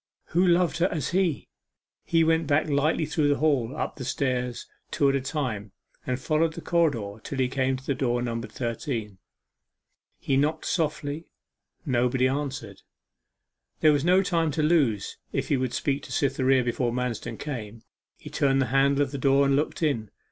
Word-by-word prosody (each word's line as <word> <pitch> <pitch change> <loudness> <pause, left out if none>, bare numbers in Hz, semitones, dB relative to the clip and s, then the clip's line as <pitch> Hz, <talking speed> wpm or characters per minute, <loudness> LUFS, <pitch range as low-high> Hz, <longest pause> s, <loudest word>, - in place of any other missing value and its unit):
Who 175 +2 +2
loved 175 -1 +3
her 175 - +4
as 160 -6 -3
he! 180 -5 0 0.6
He 165 -1 +2
went 160 -1 +2
back 145 +2 +2
lightly 150 +2 +1
through 155 -1 +1
the 145 - +3
hall, 140 -4 +1
up - - -3
the 135 - -5
stairs, 125 -2 -2 0.2
two 140 - +2
at 135 - +1
a 135 - 0
time, 125 - -3 0.3
and 125 0 -1
followed 155 +3 +1
the 170 - -6
corridor 135 - 0
till 140 - -5
he 130 -1 +2
came 130 0 0
to 130 - -14
the 140 - 0
door 125 -2 0
numbered 115 -1 -4
thirteen. 115 -4 -4 1.0
He 135 - 0
knocked 150 +3 0
softly: 150 -2 -2 0.6
nobody 125 -1 +2
answered. 135 -7 -4 1.0
There 155 -1 +6
was 145 -1 +1
no 180 +3 +4
time 165 -4 +1
to 155 - 0
lose 140 - +1 0.2
if - - -2
he 140 - +3
would 130 -1 -1
speak 140 -2 -1
to - - -11
Cytherea 135 -2 +2
before 120 0 -1
Manston 125 -2 -3
came. 115 -6 -6 0.3
He - - -11
turned 135 -1 +2
the 135 - +2
handle 140 +1 +4
of 140 - -4
the 140 - -4
door 135 +1 +4
and 140 0 +3
looked 150 +3 -1
in. 115 -9 0
140 Hz, 180 wpm, -26 LUFS, 125-155 Hz, 1.0 s, There